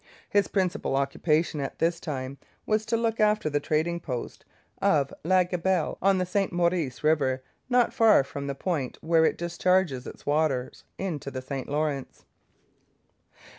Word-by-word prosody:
His 205 -1 +2
principal 190 -6 0
occupation 150 +3 +1
at 135 - -5
this 170 +1 +1
time 135 -4 -5 0.3
was 215 0 0
to 230 - +1
look 225 -1 -1
after 210 -7 +2
the 145 - +1
trading 160 +4 0
post 125 -7 -6 0.4
of 140 -3 +2
La 185 +3 +4
Gabelle 180 -1 -1
on 195 0 +4
the 185 - 0
St 195 +2 0
Maurice 170 -7 0
river, 135 -4 +2 0.3
not 245 -2 +3
far 220 -10 +5
from 140 +1 -6
the 140 - -3
point 145 -5 -2
where 160 0 +3
it - - +1
discharges 170 -5 +1
its - - -11
waters 145 -4 0
into 155 -7 -4
the 130 -1 -6
St 135 -1 -5
Lawrence. 145 -2 -2
160 Hz, 155 wpm, -27 LUFS, 140-185 Hz, 0.4 s, far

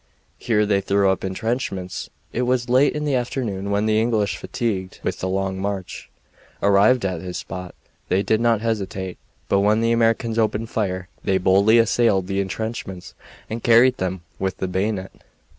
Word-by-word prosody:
Here 105 -3 +2
they 100 -1 +2
threw 100 0 +2
up 95 - -2
intrenchments. 95 -2 -3 0.2
It 120 - -1
was 125 -1 0
late 130 +4 +4
in 150 0 -2
the 145 - 0
afternoon 120 -6 -2
when 100 +1 +1
the 110 0 +3
English, 110 -4 +1
fatigued 110 -8 -3
with - - -2
the 95 - -2
long 95 0 -1
march, 100 -1 -4 0.5
arrived 100 +4 +4
at 90 -4 -2
this 90 -1 -5
spot. 90 -1 -7 0.3
They 95 +2 +2
did 110 +1 +1
not 115 -2 +2
hesitate, 95 -5 -3 0.3
but 100 - +3
when 105 +2 +3
the 115 0 +2
Americans 115 0 +2
opened 110 +1 0
fire 95 -4 -2 0.2
they 95 - +2
boldly 100 +4 +4
assailed 115 -4 +3
the 95 +1 -1
intrenchments 100 -2 -5 0.3
and 115 +1 -5
carried 120 +3 +5
them 95 -1 -3 0.2
with 95 -1 -2
the 95 - -2
bayonet. 95 +1 -2
100 Hz, 170 wpm, -22 LUFS, 95-115 Hz, 0.5 s, carried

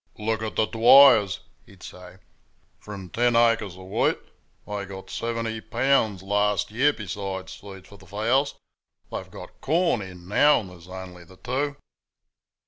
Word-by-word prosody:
"Look 110 +1 -2
at 110 -1 -4
the 110 - +2
Dwyers," 115 -2 +6 0.3
he'd 95 -2 -17
say; 90 0 -12 0.6
"from 100 -3 -9
ten 120 0 +1
acres 115 -5 +2
of 95 - -11
wheat 95 - 0 0.5
they 105 -1 -5
got 95 -1 -10
seventy 115 -1 -3
pounds 115 -7 +1
last 105 +1 0
year, 135 +7 +3
besides 95 -4 -6
feed 95 -2 -12
for 100 - -15
the 95 - -18
fowls; 115 - 0 0.6
they've - - -6
got - - -12
corn 160 - +1
in 90 -2 -10
now, 145 +9 +4
and 95 -4 -11
there's 85 -1 -15
only 90 -1 -9
the 95 +2 -18
two." 140 +6 -2
105 Hz, 150 wpm, -25 LUFS, 95-115 Hz, 0.6 s, Dwyers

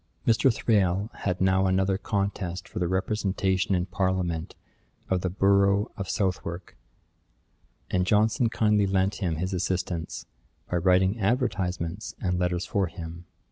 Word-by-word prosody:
Mr. 115 +3 +4
Thrale 100 -2 +1
had 90 -2 -2
now 95 0 +3
another 95 +1 +2
contest 100 -3 -2
for - - -6
the 90 - 0
representation 95 0 0
in 90 0 0
parliament 90 -3 -1 0.6
of 95 -1 +2
the 95 - -1
borough 100 +2 +3
of 100 -2 -5
Southwark, 90 -2 -2 1.2
and 90 0 +1
Johnson 110 +3 +3
kindly 105 -3 +2
lent 95 0 +1
him 90 -5 -1
his 90 +4 -3
assistance, 90 -2 -2 0.4
by 90 - -1
writing 95 +4 +3
advertisements 95 -5 -1
and 90 -2 -1
letters 90 0 0
for 100 -2 0
him. 85 0 -8
95 Hz, 135 wpm, -27 LUFS, 90-100 Hz, 1.2 s, Mr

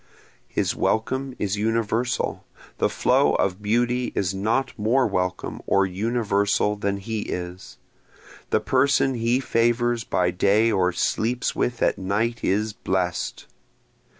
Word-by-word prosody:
His - - -1
welcome 130 +4 -1
is 100 0 -1
universal, 115 +2 -1 0.4
the - - +2
flow - - +2
of 95 +1 0
beauty 120 +4 0
is 95 -1 0
not 110 +7 0
more 120 +5 +2
welcome 90 -4 -2
or 100 0 +3
universal 100 0 0
than 100 -1 -2
he 110 +3 -4
is, 90 -2 -6 0.7
The - - +2
person 135 0 +2
he 120 +1 +1
favors 120 -1 +1
by 90 -4 +1
day 100 +5 +3
or 95 -3 +2
sleeps 120 +7 -1
with 120 -1 -1
at - - +1
night 110 +5 -1
is 105 +3 0
blessed. 90 -3 -2
110 Hz, 125 wpm, -24 LUFS, 100-120 Hz, 0.7 s, or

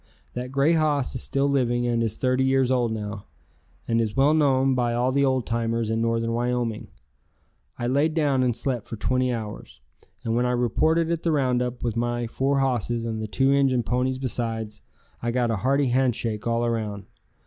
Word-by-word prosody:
That 125 +1 -5
grey 140 +4 +3
hoss 150 -4 +1
is 125 - -2
still 140 +1 0
living 120 -3 +1
and 120 -1 +1
is 115 -3 -1
30 130 0 +1
years 130 -1 +2
old 120 -3 +1
now, 105 -2 -5 0.6
and 115 0 +2
is 110 +2 -3
well 140 +3 +5
known 135 -3 +3
by 120 -2 0
all 125 +2 +1
the 140 +1 +2
old 130 -2 +1
timers 115 -1 -1
in 115 0 0
northern 115 0 0
Wyoming. 120 -2 -1 0.9
I 120 - -3
laid 145 +5 +1
down 145 -5 +2
and 125 -3 +1
slept 125 -5 -3
for - - -5
twenty 130 +4 0
hours, 110 -3 -6 0.4
and 115 0 -1
when 120 +1 +2
I 125 - 0
reported 155 +8 +1
at 165 -1 -1
the 165 - 0
roundup 125 -4 0
with 115 -2 -1
my 120 0 -1
four 135 +4 0
hosses 120 -3 -1
and 110 -1 -3
the 110 - -3
two 135 +5 +2
Injun 135 -3 +2
ponies 125 +2 0
besides, 115 -4 -3 0.4
I 120 - -1
got 120 -1 +1
a 110 - 0
hearty 135 +5 +1
handshake 120 -4 0
all 115 0 +1
around. 110 -4 -3
125 Hz, 190 wpm, -25 LUFS, 115-135 Hz, 0.9 s, well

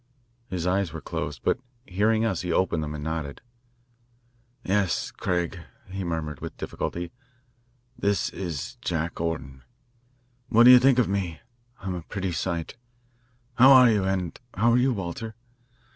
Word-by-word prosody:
His 90 -2 -3
eyes 95 -1 +1
were 80 - -6
closed, 70 -2 -5
but - - +1 0.3
hearing 110 +4 +2
us 95 -6 0
he 90 -1 -3
opened 85 -2 +1
them 75 0 -4
and 75 - -6
nodded. 80 -3 -4 1.2
"Yes, 95 -2 0
Craig," 90 +1 -2 0.3
he 95 0 -4
murmured 80 -5 -3
with - - -7
difficulty, 85 0 -4 0.9
"this 100 -4 +1
is 85 -8 -5
Jack 80 0 -3
Orton. 70 -5 -3 0.9
What 115 0 +6
do 125 - +10
you 125 - +10
think 130 0 +4
of 125 - +3
me? 95 -5 -2 0.4
I'm 95 -2 -3
a 90 - -4
pretty 95 +2 -4
sight. 85 +2 -3 0.8
How 130 +2 +9
are 125 -2 +8
you? 105 -3 +2
And 95 -3 -2 0.2
how 115 +4 +3
are 120 - +4
you, 130 +2 +3
Walter? 105 +2 -5
90 Hz, 150 wpm, -26 LUFS, 80-105 Hz, 1.2 s, do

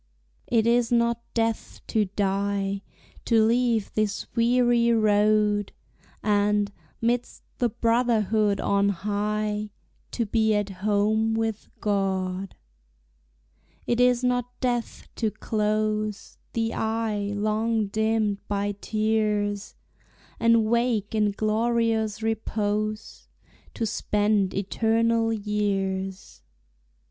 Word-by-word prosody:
It 225 -2 +2
is 235 0 +2
not 235 0 +2
death 225 -1 -1
to 215 -2 +2
die, 200 0 -1 0.4
To 225 -2 +4
leave 230 -2 +1
this 215 -1 -1
weary 240 0 +3
road, 210 -1 +2 0.5
And, 205 -1 +2 0.3
midst 240 +1 -1 0.2
the 245 - +2
brotherhood 225 -3 +1
on 200 0 +2
high, 210 +2 -2 0.4
To 235 - 0
be 220 0 +2
at 205 -1 0
home 210 +3 +1
with 225 -1 -2
God. 195 -2 -1 1.3
It 240 - 0
is 250 0 +4
not 245 0 -1
death 245 -2 -2
to 225 - +1
close 215 0 -2
The 225 0 -1
eye 220 -2 -1
long 215 +1 0
dimmed 215 0 0
by 205 0 -1
tears, 210 -2 0 0.6
And 230 -1 +4
wake 235 -2 0
in 210 -1 +2
glorious 220 0 0
repose, 215 -1 -2 0.5
To 230 - -1
spend 205 -2 0
eternal 225 +3 +1
years. 195 -3 -2
215 Hz, 95 wpm, -25 LUFS, 205-230 Hz, 1.3 s, To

